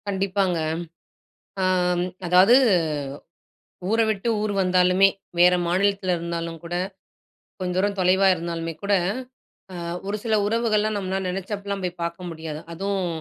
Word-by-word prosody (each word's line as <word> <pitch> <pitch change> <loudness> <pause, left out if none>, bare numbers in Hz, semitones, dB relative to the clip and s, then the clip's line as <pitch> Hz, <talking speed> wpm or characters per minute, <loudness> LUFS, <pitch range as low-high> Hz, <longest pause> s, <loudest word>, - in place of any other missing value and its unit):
கண்டிப்பாங்க. 195 -2 0 1.1
அம் 180 -1 +2 0.2
அதாவது, 185 +7 +6 1.3
ஊர 225 +2 +2
விட்டு 215 +2 -1
ஊர் 210 -1 -1
வந்தாலுமே, 185 +1 +4 0.3
வேற 180 +1 +7
மாநிலத்தில 190 0 +1
இருந்தாலும் 170 -1 -4
கூட, 170 +1 -4 0.8
கொஞ்ச 180 -1 -2
தூரம் 200 +1 +1
தொலைவா 190 +2 +4
இருந்தாலுமே 165 -1 -4
கூட 200 0 +1 0.8
அ - - -7 0.3
ஒரு 205 +1 -1
சில 225 -2 +1
உறவுகள்லாம் 215 -1 +1
நம்மன்னா 190 -1 -2
நெனைச்சப்பல்லாம் 200 +2 -4
போய் 180 -1 -4
பார்க்க 170 +2 -4
முடியாது. 160 -2 -6
அதுவும் 195 +2 -2
185 Hz, 120 wpm, -24 LUFS, 175-200 Hz, 1.3 s, வேற